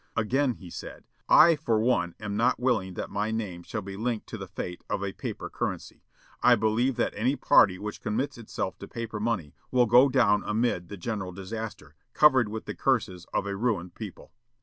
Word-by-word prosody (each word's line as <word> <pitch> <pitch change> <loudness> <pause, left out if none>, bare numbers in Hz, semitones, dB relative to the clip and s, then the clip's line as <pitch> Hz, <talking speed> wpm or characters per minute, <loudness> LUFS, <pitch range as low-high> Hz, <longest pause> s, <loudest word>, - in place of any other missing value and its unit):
Again 125 +4 +2
he 90 -6 -12
said: - - -8 0.3
"I 165 0 +8
for 120 -8 0
one 110 -7 +1
am 105 -1 -4
not 115 +3 +2
willing 115 -8 0
that - - -5
my 105 +1 -1
name 105 -6 -3
shall 110 +3 -5
be 95 0 -7
linked 115 +1 -2
to - - -5
the - - -6
fate 90 0 -6
of 100 - -1
a 95 -1 -3
paper - - -5
currency. - - -5 0.4
I 125 - +6
believe 115 +4 +1
that - - 0
any 120 +7 +1
party 90 -8 +5
which 105 +2 -6
commits 110 +7 -2
itself 115 -2 -5
to - - -8
paper 115 -2 -5
money 105 -9 -2 0.2
will 125 -1 +4
go 125 +4 +6
down 115 -6 +3
amid 105 -5 0
the 100 - -8
general 95 -1 -4
disaster, 100 -5 -7 0.2
covered 130 -7 +5
with 110 +1 -6
the - - -4
curses 110 -9 0
of - - 0
a 100 -1 -3
ruined 100 -5 -1
people. 105 -2 -9
110 Hz, 195 wpm, -27 LUFS, 100-120 Hz, 0.4 s, I